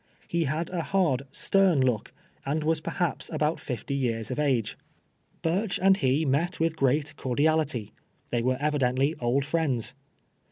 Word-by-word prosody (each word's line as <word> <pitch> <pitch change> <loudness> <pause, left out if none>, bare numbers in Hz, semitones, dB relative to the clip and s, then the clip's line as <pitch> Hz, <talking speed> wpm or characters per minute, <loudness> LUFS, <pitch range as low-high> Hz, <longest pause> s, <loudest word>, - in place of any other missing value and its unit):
lie 170 -1 +2
had 155 +5 -2
a 175 -2 -1
hard, 155 -8 +1
stern 190 -3 +3
look, 125 -5 0 0.3
and 150 +3 -1
was 160 0 +1
perhaps 170 -2 -2
ahont 155 +2 0
fifty 130 +1 -4
years 120 -3 -1
of 130 - -3
age. 130 -7 +1 0.7
Burcli 185 +5 0
and 190 +1 +5
he 135 +2 +2
met 155 +7 +1
Avithgrcnit 150 -3 +1
cordiali 150 +3 +1
ty. 110 -5 -5 0.4
They 120 - +1
Avere 130 +2 +1
evidently 140 -1 +1
C'hl 125 0 0
friends. 135 -6 0
145 Hz, 150 wpm, -27 LUFS, 130-160 Hz, 0.7 s, and